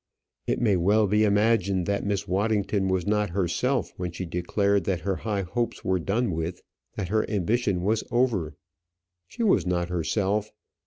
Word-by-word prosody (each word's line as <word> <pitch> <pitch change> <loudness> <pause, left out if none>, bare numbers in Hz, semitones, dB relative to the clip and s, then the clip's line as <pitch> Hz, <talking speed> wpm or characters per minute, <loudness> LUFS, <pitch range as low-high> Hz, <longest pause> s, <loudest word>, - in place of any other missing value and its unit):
It - - 0
may 105 -6 +3
well 105 +5 +3
be 105 +2 +2
imagined 100 -3 +2
that 100 +1 -1
Miss 100 -1 -2
Waddington 100 0 0
was 95 -2 0
not 105 0 +1
herself 100 +8 0
when 90 -1 -3
she 90 +2 -5
declared 100 +3 0
that 90 -3 -1
her 95 -2 -1
high 105 -3 -2
hopes 115 +6 -3
were 95 0 +1
done 110 +6 0
with, 80 +2 -4 0.3
that 95 -4 -3
her 110 +1 +2
ambition 100 -2 0
was 110 +3 +1
over. 115 - 0 0.7
She 235 - -4
was 210 - +4
not 90 -1 0
herself. 100 +4 0
100 Hz, 165 wpm, -26 LUFS, 90-110 Hz, 0.7 s, was